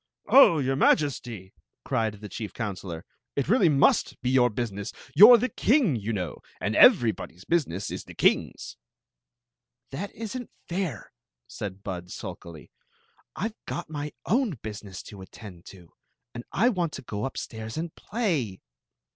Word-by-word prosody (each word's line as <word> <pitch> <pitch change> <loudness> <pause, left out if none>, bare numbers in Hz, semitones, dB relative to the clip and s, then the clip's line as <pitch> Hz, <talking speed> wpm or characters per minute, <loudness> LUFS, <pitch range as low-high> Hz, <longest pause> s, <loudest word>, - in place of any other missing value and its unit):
"Oh, 265 -11 +8
your 135 -2 0
Majesty!" 120 -9 +1 0.3
cried 110 -2 0
the 105 - -7
chief 105 +2 -6
counselor, 95 -7 -5
" - - -61
it 140 - -1
really 200 -3 +4
must 140 -2 +3
be 125 - +1
your 125 -2 +4
business. 105 -3 -4 0.2
You 215 +5 +10
're 240 - +10
the 245 +3 0
king, 230 - +2
you 110 0 -3
know; 90 -7 -4 0.2
and 100 +4 -1
everybody's 110 - +4
business 130 - -1
is - - -6
the - - -12
king's." - - 0 1.1
"That 185 +9 -5
is 225 +1 -6
n't 245 -2 -6 0.2
fair," 175 - -4 0.4
said 100 -1 -7
Bud, 90 -2 -6
sulkily. 85 -3 -9 0.6
"I 210 +6 -2
Ve 220 - -20
got 170 -2 -5
my 150 0 -4
own 225 - +1
business 100 -4 -7
to 100 -2 -11
attend 95 -2 -12
to, 90 -4 -14 0.4
and 120 0 -7
I 240 - +3
want 175 -8 -1
to - - -7
go 105 -3 -5
up 135 - -4
stairs 110 +2 -6
and 165 0 -4
play." 160 - -2
120 Hz, 160 wpm, -26 LUFS, -, 1.1 s, You